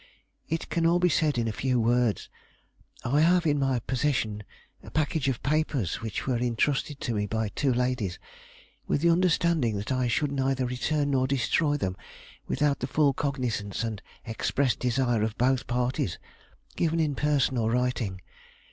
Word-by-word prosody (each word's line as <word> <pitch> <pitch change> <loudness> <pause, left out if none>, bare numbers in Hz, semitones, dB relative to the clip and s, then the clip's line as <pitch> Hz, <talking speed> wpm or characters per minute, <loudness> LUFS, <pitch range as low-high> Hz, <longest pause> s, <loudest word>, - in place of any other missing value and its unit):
"It 165 - -2
can 165 -1 +1
all 170 +1 +4
be 180 0 +3
said 150 -3 +1
in 115 -1 0
a - - 0
few 125 +2 0
words. 120 -1 +1 0.8
I 140 +5 +3
have 175 +1 +4
in 145 -2 +2
my 135 -2 +1
possession 120 -5 -1 0.4
a - - -11
package 155 -2 0
of 130 - -3
papers 140 - 0
which 110 -2 -4
were 125 -3 0
intrusted 135 +4 0
to 120 - -2
me 105 -1 -1
by 110 0 -1
two 135 +5 0
ladies, 125 -6 -1 0.7
with 145 - 0
the 170 +1 +4
understanding 165 - +2
that 100 +4 -4
I 130 -1 +1
should 140 +4 0
neither 135 -1 0
return 140 +4 -1
nor 130 -1 +2
destroy 145 +3 +1
them 95 -9 -2 0.5
without 145 -2 +1
the 130 - -2
full 145 0 +3
cognizance 125 -8 -2
and 110 -3 -4 0.2
expressed 125 +3 0
desire 125 -2 +1
of 110 +1 -2
both 130 +1 +1
parties, 125 -6 -1 0.6
given 165 0 +1
in 155 -3 +1
person 145 -2 +1
or 115 -2 +1
writing. 120 -6 -1
130 Hz, 165 wpm, -27 LUFS, 115-145 Hz, 0.8 s, all